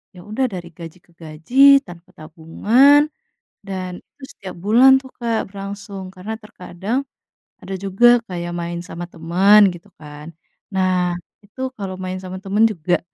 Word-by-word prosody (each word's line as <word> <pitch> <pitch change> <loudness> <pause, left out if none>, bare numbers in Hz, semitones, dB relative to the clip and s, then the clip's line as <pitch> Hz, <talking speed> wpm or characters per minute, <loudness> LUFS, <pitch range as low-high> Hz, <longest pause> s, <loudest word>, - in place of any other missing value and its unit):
ya 180 - -12
udah 215 +6 -1
dari 175 -2 -7
gaji 165 +1 -11
ke 175 - -29
gaji 245 - +4
tanpa 175 0 -14
tabungan, 220 - +3 0.6
dan 185 -2 -6
itu 280 - -17
setiap 185 -1 -9
bulan 240 +8 +5
tuh, 260 - -13
Kak, 230 -2 -1
berlangsung, 200 -1 -8
karena 195 +4 -6
terkadang, 210 +4 -5 0.6
ada 195 - -7
juga 235 +6 +4
kayak 175 -2 -5
main 170 0 -4
sama 175 0 -7
teman 190 +5 +4
gitu 175 -1 -14
kan, 150 +1 -11 0.4
nah 185 -2 +1 0.3
itu 215 +6 -12 0.2
kalau 195 -3 -5
main 185 0 -4
sama 185 0 -7
teman 205 +3 +2
juga, 175 -4 -1
190 Hz, 145 wpm, -20 LUFS, 175-215 Hz, 0.6 s, bulan